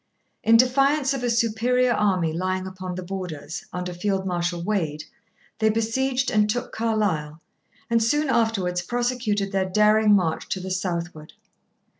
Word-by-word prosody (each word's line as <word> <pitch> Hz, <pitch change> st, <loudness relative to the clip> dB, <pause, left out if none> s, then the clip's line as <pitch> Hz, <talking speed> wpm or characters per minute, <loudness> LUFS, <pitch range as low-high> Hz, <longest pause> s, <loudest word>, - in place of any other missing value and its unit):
In 230 Hz, +1 st, +6 dB
defiance 275 Hz, +3 st, +3 dB
of 270 Hz, -, -3 dB
a 245 Hz, -, +1 dB
superior 235 Hz, +2 st, +2 dB
army 185 Hz, -7 st, +1 dB
lying 185 Hz, +2 st, -2 dB
upon 185 Hz, -1 st, -6 dB
the 185 Hz, -, -5 dB
Borders, 175 Hz, -5 st, -6 dB
under 180 Hz, 0 st, -4 dB
Field 190 Hz, +2 st, -1 dB
Marshal 175 Hz, -1 st, -2 dB
Wade, 165 Hz, -7 st, -2 dB, 0.6 s
they 220 Hz, 0 st, +3 dB
besieged 250 Hz, +4 st, 0 dB
and 210 Hz, 0 st, +2 dB
took 245 Hz, +3 st, -2 dB
Carlisle, 200 Hz, -9 st, -1 dB, 0.5 s
and 230 Hz, -1 st, +2 dB
soon 295 Hz, +7 st, +1 dB
afterwards 220 Hz, -8 st, +1 dB
prosecuted 240 Hz, -2 st, -1 dB
their 190 Hz, -1 st, 0 dB
daring 210 Hz, +1 st, +4 dB
march 165 Hz, -5 st, -1 dB
to -, -, -2 dB
the 185 Hz, +1 st, -6 dB
southward. 170 Hz, -4 st, -4 dB
205 Hz, 145 wpm, -24 LUFS, 180-230 Hz, 0.6 s, In